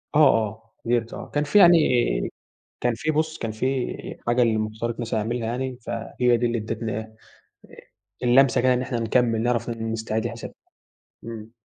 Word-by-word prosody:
آه - - +5
آه، 115 -6 +2
قدرت 115 -1 0
آه، - - -8
كان 145 - +1
في 180 +8 +4
يعني 175 -3 +8 1.0
كان 120 -1 +1
في 155 +7 -1
بُصّ 155 +1 -1
كان 115 - -3
في 130 +4 -3
حاجة 120 +1 +3
المُفترض 110 +1 -1
مثلًا 115 -1 -1
أعملها 115 +1 -2
أنا، 130 0 -4
فهي 120 +2 0
دي 120 - 0
اللي 120 0 0
ادتني 110 0 -3
إيه 110 0 -8 1.1
اللمسة 125 +1 +5
كده 130 +1 +3
إن 125 - 0
إحنا 125 -2 -3
نكمّل 115 0 +1
نعرف 120 0 0
نستعيد 110 -1 -3
الحساب، 115 0 -7 0.7
إمم. 115 -1 -8
115 Hz, 160 wpm, -24 LUFS, 110-125 Hz, 1.1 s, يعني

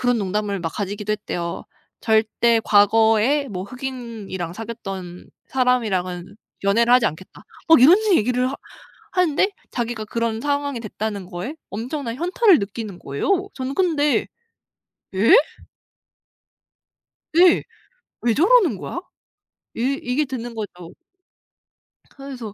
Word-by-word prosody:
그런 245 -1 +2
농담을 200 0 -2
막 165 -1 -3
가지기도 205 +1 -3
했대요. 175 -5 -4 0.4
"절대 225 +1 +2
과거에 225 +6 +4
뭐 185 -3 -5
흑인이랑 230 -8 -6
사귀었던 195 -5 -7 0.2
사람이랑은 200 -8 0 0.3
연애를 230 +5 +3
하지 250 -2 +5
않겠다." 155 +5 -7 0.2
막 325 -5 +7
이런 305 +9 +8 0.2
얘기를 250 +3 +1
하 275 - -5 0.6
하는데 365 0 +2 0.2
자기가 235 -2 -3
그런 230 0 -2
상황이 285 -2 -1
됐다는 210 -3 -5
거에 185 - -6
엄청난 235 +3 -4
현타를 360 - +3
느끼는 200 -1 -6
거예요. 375 - -1
저는 260 +1 -4
근데 300 -5 +1 0.9
"예?" 205 +5 +6 2.0
네. 345 +1 +5 0.6
'왜 235 -2 +2
저러는 370 - +4
거야?' 345 - -5 0.7
이 265 +4 -1
이게 250 +5 0
드는 240 -3 -6
거죠. 180 -6 -7 1.2
그래서 260 -6 -8
230 Hz, 260 characters per minute, -22 LUFS, 205-270 Hz, 2.0 s, 이런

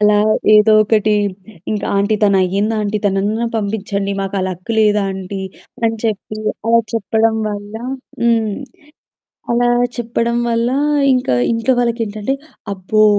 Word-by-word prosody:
అలా 210 0 +4 0.4
ఏదో 215 +1 +6
ఒకటి 215 0 +2 0.6
ఇంకా 210 -2 -2
"ఆంటీ 205 +2 +2
తనయ్యిందాంటీ 205 +2 +1
తననన్నా 205 +4 0
పంపిచ్చండి. 200 -2 -2
మాకు 195 0 -3
ఆ - - -1
లక్ 185 +3 -7
లేదాంటీ." 195 -2 0 0.4
అని 225 0 +1
చెప్పి 215 -1 -2 0.3
అలా 230 0 +5
చెప్పడం 220 +1 +1
వల్ల 205 0 -6 0.5
హ్మ్. 225 -2 +2 1.0
అలా 240 +1 +2 0.3
చెప్పడం 235 0 -1
వల్ల, 230 0 +1 0.5
ఇంకా 250 - +1 0.2
ఇంట్లో 230 +3 +1
వాళ్ళకేంటంటే 230 -1 -1 0.4
అబ్బో! 200 +3 +2
215 Hz, 115 wpm, -17 LUFS, 200-225 Hz, 1.0 s, ఏదో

